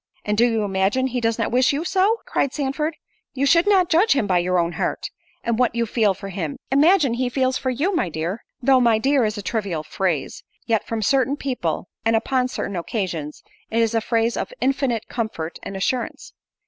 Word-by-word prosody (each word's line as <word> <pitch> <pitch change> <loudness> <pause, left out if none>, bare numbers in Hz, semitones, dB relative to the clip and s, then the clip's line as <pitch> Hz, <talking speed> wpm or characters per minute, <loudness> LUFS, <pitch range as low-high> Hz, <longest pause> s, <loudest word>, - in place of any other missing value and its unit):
"And 210 - 0
do 235 +3 +4
you 225 -2 0
imagine 195 +6 +1
he 250 -1 -2
does 230 -1 +1
not 230 - -1
wish 250 +1 +4
you 290 +4 -2
so?" 395 +5 +2
cried 275 - 0
Sandford. 300 +2 -1 0.4
"You 275 +1 +1
should 335 +7 +4 0.2
judge 350 +8 +4
him 275 -6 +1
by 185 -3 +2
your 180 +1 +1
own 170 -1 +1
heart; - - -3 0.3
and 235 0 -1
what 250 -2 +2
you 235 0 +1
feel 215 -3 +1
for 195 +1 -8
him, 170 -6 -4
imagine 295 -1 +4
he 250 +1 -1
feels 260 0 0
for 260 - -1
you, 305 +10 0
my 185 - 0
dear." 165 +7 -4 0.2
Though 265 0 +5
"my 230 -2 +4
dear" 270 +1 +2
is 215 0 -2
a 205 - -5
trivial 195 -9 -2
phrase, 165 -4 -2 0.2
yet 225 -2 0
from 225 -1 -2
certain 270 +4 +2
people, 245 - -2 0.2
and 225 0 +2
upon 250 +3 +1
certain 200 -6 -4
occasions, 170 -5 -4 0.3
it 225 - -2
is 225 0 0
a 225 - +2
phrase 230 +1 +1
of - - -3
infinite 260 -4 0
comfort 215 -9 -4
and 195 - -6
assurance. 240 +5 -3
230 Hz, 205 wpm, -22 LUFS, 195-265 Hz, 0.4 s, Though